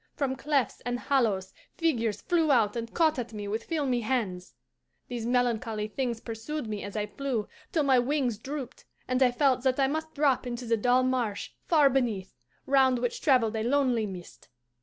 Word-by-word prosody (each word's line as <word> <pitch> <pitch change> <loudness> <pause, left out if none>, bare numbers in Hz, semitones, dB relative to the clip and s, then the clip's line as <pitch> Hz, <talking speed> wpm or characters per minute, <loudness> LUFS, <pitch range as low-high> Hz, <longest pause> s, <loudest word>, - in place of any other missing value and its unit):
From 270 -3 -1
clefts 275 -3 0
and 245 0 -2
hollows 225 -9 0 0.2
figures 235 -11 0
flew 330 -4 +2
out 225 -5 +3
and 230 -1 -4
caught 315 -4 +2
at 235 -2 -5
me 205 -1 -5
with 220 +3 -3
filmy 280 -7 0
hands. 210 -7 -2 0.5
These 235 -2 -4
melancholy 230 -3 0
things 240 -1 -2
pursued 235 +6 -5
me 210 -2 -4
as 200 +1 -7
I 210 - 0
flew, 240 -1 -3 0.2
till 315 - +2
my 265 -3 +4
wings 250 -4 0
drooped, 270 0 -7 0.2
and 255 +1 0
I 255 - +6
felt 255 +1 +2
that 260 +1 +1
I 270 - +5
must 315 +3 -3
drop 280 -4 +2
into 245 0 -4
the 230 0 +2
dull 245 +3 +3
marsh 250 -5 -1 0.2
far 305 -4 +5
beneath, 235 -8 0 0.3
round 265 -2 +4
which 245 0 -2
travelled 240 -6 +3
a 220 - -1
lonely 245 -2 +1
mist. 180 -3 -10
245 Hz, 180 wpm, -28 LUFS, 225-275 Hz, 0.5 s, I